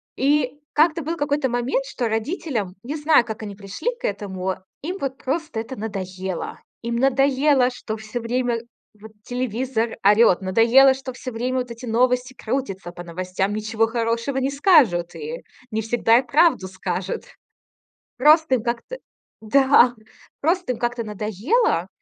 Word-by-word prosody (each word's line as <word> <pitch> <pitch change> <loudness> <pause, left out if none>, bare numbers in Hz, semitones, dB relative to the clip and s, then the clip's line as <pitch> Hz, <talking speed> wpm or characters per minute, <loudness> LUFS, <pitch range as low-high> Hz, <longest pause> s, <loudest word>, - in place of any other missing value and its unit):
И 285 0 +1
как-то 315 +2 +3
был 330 +3 -3
какой-то 285 -2 0
момент, 245 +3 -1
что 250 -3 -3
родителям, 225 - -2
не 285 +5 -4
знаю, 300 -4 +4
как 220 -1 -6
они 200 -2 -6
пришли 200 - -4
к - - -5
этому, 190 -2 -3 0.3
им 355 +6 -4
вот 265 -1 -3
просто 295 -3 -3
это 230 +4 -6
надоело. 190 -4 -5 0.2
Им 235 0 -3
надоело, 270 +1 +3
что 220 -3 -6
всё 220 +2 -6
время 240 0 -1 0.4
вот 220 +1 -12
телевизор 245 -1 -2
орёт, 205 -1 +5
надоело, 230 +8 +5
что 265 0 -7
всё 255 +1 -7
время 250 +3 -1
вот 245 -1 -4
эти 235 +2 -8
новости 250 +2 +1
крутятся 210 -9 -4
по 175 0 -9
новостям, 185 +3 -3
ничего 215 +1 0
хорошего 230 +3 -1
не 265 +1 +1
скажут 275 - +3
и 470 +3 -6 0.3
не 220 +1 -1
всегда 230 +1 +3
и 265 - -2
правду 275 - +3
скажут. 185 - -4 0.9
Просто 300 +2 +5
им 225 - -4
как-то 240 - -4 0.4
да, 265 +1 +5 0.5
просто 340 -1 +1
им 235 - -7
как-то 240 -1 -2
надоело. 210 - 0
240 Hz, 150 wpm, -22 LUFS, 215-270 Hz, 0.9 s, орёт